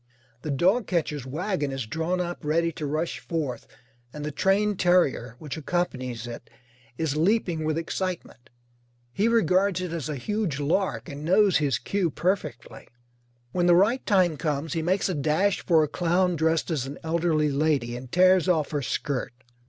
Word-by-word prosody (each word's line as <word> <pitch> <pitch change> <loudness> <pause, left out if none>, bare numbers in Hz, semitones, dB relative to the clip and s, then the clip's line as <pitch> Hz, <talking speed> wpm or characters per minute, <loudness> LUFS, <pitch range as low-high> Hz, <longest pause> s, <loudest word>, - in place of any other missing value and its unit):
The 155 - -5
dogcatcher's 170 - 0
wagon 155 0 -2
is 135 -3 -3
drawn 160 +9 -2
up 175 -1 -4
ready 165 +3 +1
to 150 -2 -5
rush 155 -1 -2
forth, 125 -1 -4 0.4
and 150 +2 -6
the 150 - -3
trained 200 +5 +1
terrier 160 -10 +2
which 150 +1 -7
accompanies 130 -8 -2
it 120 0 -9 0.5
is 160 -3 -1
leaping 175 -1 +1
with 155 0 0
excitement. 165 -7 -4 0.6
He 205 - +1
regards 195 -4 +2
it 180 -2 -4
as 155 -4 -4
a 150 - -2
huge 170 - -2
lark, 175 +8 0
and 145 -2 -7
knows 190 +3 +4
his 140 -6 +1
cue 195 +3 -1
perfectly. 170 - -3 0.6
When 175 +3 +1
the 175 - +6
right 215 +8 +3
time 180 -6 +3
comes 150 -1 -2
he 165 - -1
makes 185 +4 +1
a 185 - -1
dash 160 +6 +1
for 160 -3 +4
a - - 0
clown 175 +3 +1
dressed 160 +2 +1
as 135 -5 -1
an 140 - -7
elderly 160 -2 +1
lady 140 -5 0
and 125 0 -9
tears 185 0 +4
off 160 -4 +1
her 145 -2 -1
skirt. 135 -2 -2
160 Hz, 170 wpm, -26 LUFS, 145-185 Hz, 0.6 s, the